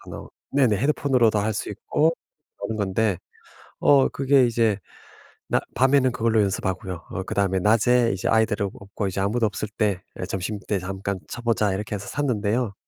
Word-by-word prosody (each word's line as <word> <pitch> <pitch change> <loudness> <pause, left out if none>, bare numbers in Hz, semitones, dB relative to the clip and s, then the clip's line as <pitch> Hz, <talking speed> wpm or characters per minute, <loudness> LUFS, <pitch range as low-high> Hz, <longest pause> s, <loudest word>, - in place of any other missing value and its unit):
나온 - - -8 0.2
네네. 130 -7 +3
헤드폰으로도 130 -5 +2
할 110 +1 0
수 - - -3
있고 160 +2 +1 0.5
하는 110 +2 -3
건데. 100 -1 0 0.6
어 140 -2 +5
그게 135 -2 +3
이제 115 -3 +1 0.7
낮 - - +1
밤에는 130 0 +4
그걸로 115 -2 +2
연습하고요. 95 -2 -2
어 95 - -3
그다음에 95 -1 0
'낮에 115 +4 +3
이제 95 - -3
아이들은 110 -2 +2
없고 100 +1 -4
이제 95 0 -2
아무도 110 +4 +1
없을 105 0 -3
때 100 -4 +1 0.2
예 - - -2
점심때 100 +2 -3
잠깐 95 +1 -4
쳐 - - -6
보자.' 110 -4 +1
이렇게 105 +2 -3
해서 100 - -6
샀는데요. 115 -5 -1
105 Hz, 355 characters per minute, -24 LUFS, 100-120 Hz, 0.7 s, 어